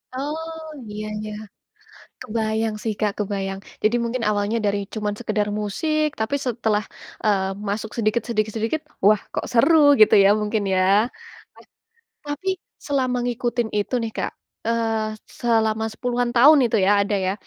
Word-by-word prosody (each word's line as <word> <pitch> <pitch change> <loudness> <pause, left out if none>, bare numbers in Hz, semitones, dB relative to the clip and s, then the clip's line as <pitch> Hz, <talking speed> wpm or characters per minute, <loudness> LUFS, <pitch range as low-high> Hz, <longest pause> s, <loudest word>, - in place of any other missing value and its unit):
Oh, 320 +4 -4 0.3
iya 210 +1 -5 0.2
ya. 215 - -5 0.9
Kebayang 220 0 -1
sih 220 -2 -1
Kak, 210 -1 +1
kebayang. 195 -1 -2 0.2
Jadi 220 +3 +3
mungkin 235 0 -2
awalnya 205 +2 0
dari 200 0 +1 0.2
cuman 210 -1 -1
sekedar 215 -3 -1
musik, 305 +9 0
tapi 220 +6 0
setelah, 220 -3 0 0.4
eee, 195 -2 +2 0.2
masuk 215 +1 -3
sedikit 225 0 +1
sedikit 215 -2 0
sedikit 230 +8 -1 0.2
wah, 210 -1 +5
kok - - -2
seru, 285 +8 +5 0.3
gitu 215 - +7
ya, 195 - +6
mungkin 210 0 -1
ya. 185 - +3 1.5
Tapi, 290 +7 -4 0.4
selama 260 -3 0
ngikutin 240 -1 -1
itu 205 +5 -2
nih 225 -1 -3
Kak, - - -2 0.4
eee, 225 -2 0 0.2
selama 220 -2 +2
10-an 245 +1 -1
tahun 290 +5 +8
itu 225 - 0
ya, - - +4
ada 205 +1 -1
ya, 190 - +1
220 Hz, 145 wpm, -22 LUFS, 210-245 Hz, 1.5 s, tahun